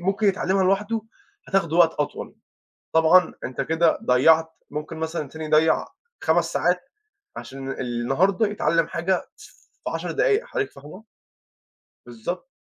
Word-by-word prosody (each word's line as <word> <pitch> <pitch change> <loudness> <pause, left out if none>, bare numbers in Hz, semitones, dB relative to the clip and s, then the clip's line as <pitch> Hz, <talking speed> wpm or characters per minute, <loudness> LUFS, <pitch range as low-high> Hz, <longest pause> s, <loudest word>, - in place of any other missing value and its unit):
ممكن 195 +4 0
يتعلَّمها 190 -1 +1
لوحده، 210 +4 +1 0.5
هتاخُده 170 -5 +1
وقت 170 -2 +6
أطول، 145 - -4 0.6
طبعًا 160 +2 +5
أنتَ 125 - -4
كده 160 0 +2
ضيَّعت، 160 +6 +4 0.2
ممكن 150 +2 -5
مثلًا 160 -2 -3
تاني 160 +3 -7
يضيِّع 155 +1 +3 0.4
5 165 +1 +3
ساعات 180 +8 0 0.5
عشان 135 0 -7
النهارده 135 - 0
يتعلَّم 165 -5 +1
حاجة، 175 +2 -1
ف 420 - -14 0.4
في - - -3
10 - - -3
دقايق، - - +2
حضرتِك 420 -4 -3
فاهمة؟ 150 +9 -12 1.0
بالضبط. 120 - -6
165 Hz, 130 wpm, -24 LUFS, 155-190 Hz, 1.0 s, وقت